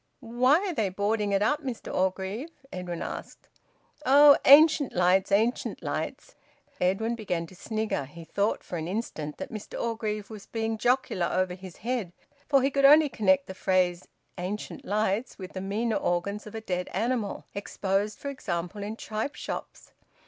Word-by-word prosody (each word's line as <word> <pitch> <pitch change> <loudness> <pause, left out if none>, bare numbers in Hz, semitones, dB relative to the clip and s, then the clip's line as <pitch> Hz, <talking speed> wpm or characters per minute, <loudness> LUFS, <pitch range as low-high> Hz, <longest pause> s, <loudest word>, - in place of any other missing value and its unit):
"Why 245 +4 +3
are 365 - -2
they 215 -9 0
boarding 205 +2 0
it 200 +1 +2
up, 295 +8 +1
Mr 255 -5 -5
Orgreave?" 190 - -1 0.2
Edwin 180 -2 -4
asked. - - -7 0.6
"Oh! 285 +1 +8
Ancient 295 0 +7
lights! 180 +2 +3
Ancient 225 +5 +1
lights!" - - -4 0.5
Edwin 195 +6 +1
began 180 -7 -2
to 185 - -15
snigger. 215 -7 -2
He 165 +5 -11
thought 200 +6 -1
for 175 - -5
an 160 - -4
instant 170 -7 -4
that - - -6
Mr 215 -2 -7
Orgreave 220 -2 -3
was 210 -2 -10
being 225 -1 -2
jocular 245 -8 +1
over 185 -1 0
his 185 -1 -10
head, 235 -8 -2 0.3
for 275 -3 +4
he 275 - +2
could 275 0 +1
only 300 +1 +8
connect 275 +4 +2
the - - -7
phrase 185 -2 +1 0.3
`ancient 195 +4 -5
lights' 215 +3 -1
with 185 -1 -8
the 185 - -4
meaner 215 +4 -1
organs 200 +5 -1
of 210 - -9
a 220 - -4
dead 180 -4 -2
animal, 225 +1 -1
exposed, 200 +1 -1
for 280 - -5
example, 185 -6 -4
in 210 +2 -4
tripe 220 +6 -4
shops. - - -7
210 Hz, 165 wpm, -28 LUFS, 185-235 Hz, 0.6 s, Oh